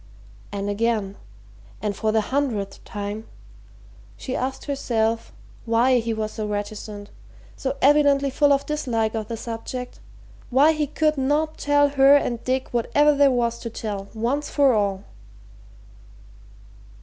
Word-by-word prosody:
And 200 0 -3
again 205 -1 -1 0.6
and 210 -2 -2
for 215 +2 0
the 220 0 +2
hundredth 215 -6 -2
time 210 +1 -6 0.9
she 260 - -5
asked 260 +1 -3
herself 230 -5 -1 0.3
why 240 +2 +3
he 230 0 -2
was 215 -1 -2
so 215 -1 -4
reticent, 205 0 -5 0.4
so 270 +1 -3
evidently 280 -1 +4
full 290 +2 +3
of 280 0 +2
dislike 240 -8 -1
of 220 -2 -3
the 230 - -5
subject, 235 +2 -6 0.5
why 275 +5 +5
he 305 -2 -1
could 305 0 0
not 300 +4 0
tell 290 0 +3
her 275 0 +6
and 240 -5 0
Dick 260 +1 -1
whatever 290 +5 +3
there 285 -1 +5
was 235 -2 0
to 230 - -5
tell, 205 -3 -5
once 250 +7 -1
for 280 -3 +4
all? 200 -3 0
235 Hz, 135 wpm, -23 LUFS, 215-280 Hz, 0.9 s, her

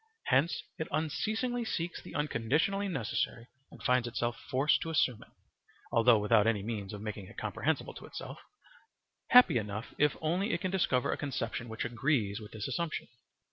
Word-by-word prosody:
Hence 140 +7 +2 0.2
it 160 - -2
unceasingly 220 - -1
seeks 175 -6 -3
the - - -11
unconditionally 150 - +1
necessary 115 - -2 0.2
and - - -14
finds 125 -2 +3
itself 120 0 -1
forced 135 +4 +3
to 165 - -3
assume 130 -7 +1
it, - - -15 0.6
although 115 0 +6
without 105 +1 +4
any 105 -3 +1
means 105 -3 -4
of 105 -1 -7
making 105 -3 -5
it 115 - -14
comprehensible 140 +8 -1
to - - -10
itself, - - -8 0.9
happy 245 - +7
enough 105 +1 -5
if 150 -1 +3
only 180 +7 0
it - - -1
can 185 -2 -1
discover 135 -10 +2
a - - -1
conception 120 -4 -3
which 110 +1 -3
agrees 120 -4 0
with 105 -1 -10
this 110 -1 -4
assumption. 170 -3 -3
125 Hz, 170 wpm, -32 LUFS, 110-160 Hz, 0.9 s, happy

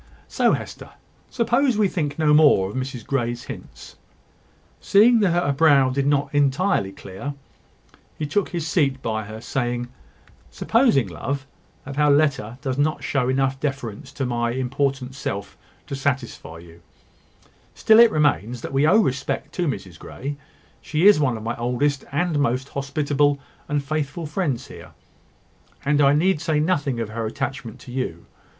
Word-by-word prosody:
So, - - +2
Hester, - - -6 0.4
suppose 240 +1 +1
we 210 -2 +3
think 155 -6 -3
no 155 -2 +3
more 150 -11 +5
of - - -10
Mrs 130 -3 -4
Grey's 120 -3 -2
hints?" - - -10 0.8
Seeing 225 +4 +5
that 200 -3 +3 0.2
her 140 - +2
brow 140 -3 +4
did 140 +1 0
not 145 -1 +1
entirely 145 - +1
clear, 100 +9 -7 0.8
he 155 - -2
took 180 +7 0
his 170 -4 -3
seat 140 -5 0
by 110 -2 -2
her, 110 +1 -8
saying: 120 0 -2 0.6
"Supposing, 225 - +2
love, 135 - -4 0.4
that 140 +1 -7
her 150 0 +4
letter 140 -6 +2
does 135 -1 -2
not 155 +2 0
show 130 -3 0
enough 135 0 0
deference 135 -2 -4
to 135 - -2
my 120 -1 -1
important 130 0 -2
self 100 -7 -5 0.3
to 140 - -5
satisfy 130 -11 -3
you, 85 0 -15 0.9
still 220 0 +5
it 235 0 +8
remains 125 - 0
that - - -6
we 140 +3 +3
owe 185 +7 +5
respect 130 -3 -3
to 175 -2 -1
Mrs 95 - -5
Grey. 140 +3 -6 0.5
She 155 +4 0
is 205 -6 +7
one 130 -6 +1
of 110 - -9
my 115 +1 -2
oldest, 125 +4 -1
and 155 +1 0
most 130 0 0
hospitable, 145 +1 0 0.3
and 145 -1 0
faithful 155 +2 -3
friends 150 -6 -2
here; - - -12 0.9
and 150 +1 +3
I 140 0 +5
need 165 0 +2
say 155 -1 0
nothing 145 -6 0
of 115 -2 -3
her 115 0 -3
attachment 120 +1 -5
to 125 - -11
you. 125 -10 -4
140 Hz, 160 wpm, -23 LUFS, 125-150 Hz, 0.9 s, it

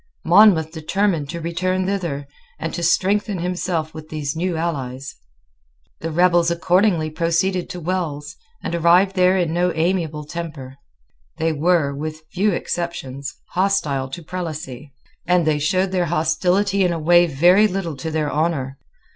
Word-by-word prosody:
Monmouth 175 -7 +5
determined 165 -1 -1
to 170 - -5
return 185 +3 -1
thither, 170 -8 -2 0.3
and 165 - -4
to 175 - -4
strengthen 195 +4 +1
himself 175 -2 -2
with 155 0 -10
these 150 -1 -3
new 175 0 -1
allies. 135 -5 -4 0.9
The 165 - -4
rebels 175 +1 +3
accordingly 170 -1 +2
proceeded 170 +3 0
to 180 - -6
Wells, 160 -4 -3 0.3
and - - -3
arrived 175 +3 +4
there 185 0 +4
in 170 -3 0
no 175 +1 +1
amiable 160 -3 -1
temper. 150 -5 -7 0.6
They 160 0 0
were, 155 -2 +2
with 155 +2 -6
few 205 +3 +1
exceptions, 160 -5 -4
hostile 165 -8 0
to 165 +6 -7
Prelacy; 155 -6 -6 0.4
and 180 -1 +3
they 155 -1 +1
showed 185 +5 +1
their 180 -2 +1
hostility 180 +5 +1
in 180 - +2
a 170 - -2
way 175 +2 +4
very 175 +8 +5
little 180 -5 -3
to 150 +5 -4
their 155 -2 -1
honour. 140 -4 -1
170 Hz, 145 wpm, -21 LUFS, 155-180 Hz, 0.9 s, Monmouth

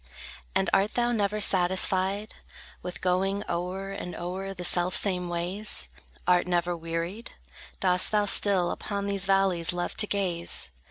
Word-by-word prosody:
And - - +1
art 195 +2 +1
thou 240 0 +1
never 210 -2 -1
satisfied 190 +2 +2 0.5
With 175 -3 -8
going 195 +2 0
o'er 185 +3 -4
and 185 -2 -7
o'er 185 +3 -5
the 180 -2 -8
selfsame 180 +1 +3
ways? 180 +5 -2 0.4
Art 180 0 +2
never 175 0 0
wearied? 165 +6 -5 0.5
Dost 180 -1 +3
thou 210 -1 +2
still 195 -3 +4
Upon 200 -1 -4
these 200 -1 +1
valleys 190 -4 +2
love 175 0 -4
to 210 - +6
gaze? 175 - -2
185 Hz, 140 wpm, -26 LUFS, 175-200 Hz, 0.5 s, to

